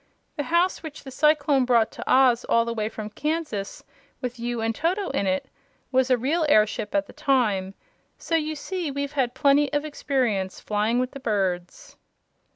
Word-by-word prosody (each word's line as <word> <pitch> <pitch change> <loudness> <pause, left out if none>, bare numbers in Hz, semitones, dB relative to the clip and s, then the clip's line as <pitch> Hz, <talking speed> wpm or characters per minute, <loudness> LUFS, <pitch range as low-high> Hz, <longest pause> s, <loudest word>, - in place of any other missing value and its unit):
The 290 - -3
house 345 +2 +2
which 315 -3 -9
the 270 - -9
cyclone 290 -1 +3
brought 235 -3 +3
to - - -7
Oz 255 -2 +5
all 230 0 +3
the 235 - -2
way 215 -1 -2
from 215 -1 -7
Kansas, 300 -8 -3 0.4
with 250 -2 -5
you 240 0 -2
and 225 0 0
Toto 365 - -1
in 200 - -1
it 190 0 0 0.4
was 260 0 +2
a 255 - +4
real 295 +8 0
airship 215 +1 +2
at 300 0 +2
the - - -14
time; 220 -10 +1 0.4
so 330 - -2
you 310 -1 0
see 345 +2 -4
we've 280 +1 -3
got 255 -3 0
plenty 280 +1 +3
of 290 0 0
experience 245 -10 -1
flying 215 +3 0
with 255 0 0
the 275 - -9
birds." 200 - -2
260 Hz, 180 wpm, -25 LUFS, 220-295 Hz, 0.4 s, Oz